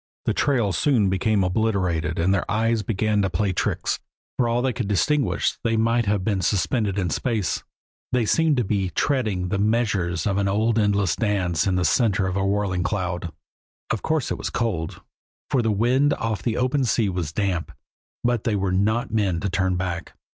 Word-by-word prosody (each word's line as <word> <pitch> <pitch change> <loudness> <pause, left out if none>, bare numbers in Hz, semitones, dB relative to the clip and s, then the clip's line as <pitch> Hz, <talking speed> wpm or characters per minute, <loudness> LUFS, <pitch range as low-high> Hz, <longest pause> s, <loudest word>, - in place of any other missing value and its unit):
The - - +1
trail 120 -8 +1
soon 105 - +2
became 100 +1 +1
obliterated 90 -5 0
and 90 +3 +2
their 95 - -1
eyes 115 +1 +1
began 105 0 0
to 95 - +1
play 95 +2 0
tricks. - - -1 0.4
For 120 -2 +1
all 120 +1 +1
they 130 -1 +1
could 120 -4 -3
distinguish, 135 +8 +1
they 115 -1 +1
might 115 0 +2
have 100 -2 +1
been 100 -2 0
suspended 100 +2 0
in 90 -4 -1
space; 110 -5 -1 0.5
they 125 -2 +2
seemed 160 +4 +2
to 125 - +2
be 100 -2 -1
treading 105 -9 0
the 100 - -1
measures 100 -6 0
of 100 -1 +1
an 100 - +1
endless 105 -2 +2
dance 95 -7 0
in 95 - +1
the 90 -1 +1
center 100 +1 +2
of 95 -1 -2
a 100 - 0
whirling 100 -2 0
cloud. 90 -3 -2 0.6
Of 115 - -1
course 160 -4 -1
it - - -2
was - - -3
cold, 95 -9 -2 0.5
for 130 - +3
the 115 - 0
wind 125 +7 +2
off 110 -4 -2
the 115 0 -1
open 130 +2 +1
sea 115 -2 +1
was 90 -5 -2
damp, 95 -2 -1 0.5
but 120 -2 +1
they 110 - 0
were 95 -2 0
not 110 +4 0
men 100 -6 +1
to 100 - -2
turn 95 -1 +1
back. 90 -2 -4
105 Hz, 190 wpm, -23 LUFS, 95-115 Hz, 0.6 s, for